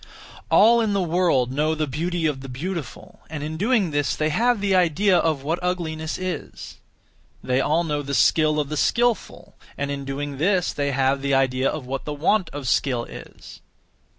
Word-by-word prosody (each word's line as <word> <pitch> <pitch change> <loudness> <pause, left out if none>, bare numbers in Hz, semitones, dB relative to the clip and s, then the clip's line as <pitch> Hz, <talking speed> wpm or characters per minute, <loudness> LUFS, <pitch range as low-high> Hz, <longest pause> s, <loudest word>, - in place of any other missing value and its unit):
All 230 +2 +6
in 215 -2 0
the 200 - +1
world 165 -8 +1
know 155 +4 0
the 155 0 -1
beauty 165 +4 -2
of 145 -4 -1
the 135 - -9
beautiful, 160 +4 -6
and 150 -2 -5
in 155 +1 -4
doing 205 -1 +1
this 145 -1 0
they 155 0 0
have 235 +7 +2
(the 200 -1 0
idea 185 +2 +3
of) 160 -5 +1
what 160 +4 -1
ugliness 165 -3 -3
is; 185 -1 -6 0.6
they 130 +1 +1
all 160 +5 +1
know 150 -3 -2
the 140 0 -3
skill 155 -1 +3
of 145 -2 -2
the 155 - -3
skilful, 240 - 0 0.2
and 140 0 -2
in 140 -1 -4
doing 140 0 -5
this 180 +2 +1
they 140 -1 -1
have 135 0 +1
(the 140 0 +1
idea 130 0 +2
of) 155 -4 -5
what 135 +1 -5
the 150 - -3
want 175 +5 +1
of 140 -2 -6
skill 125 -2 +1
is. - - -12
155 Hz, 190 wpm, -23 LUFS, 140-180 Hz, 0.6 s, All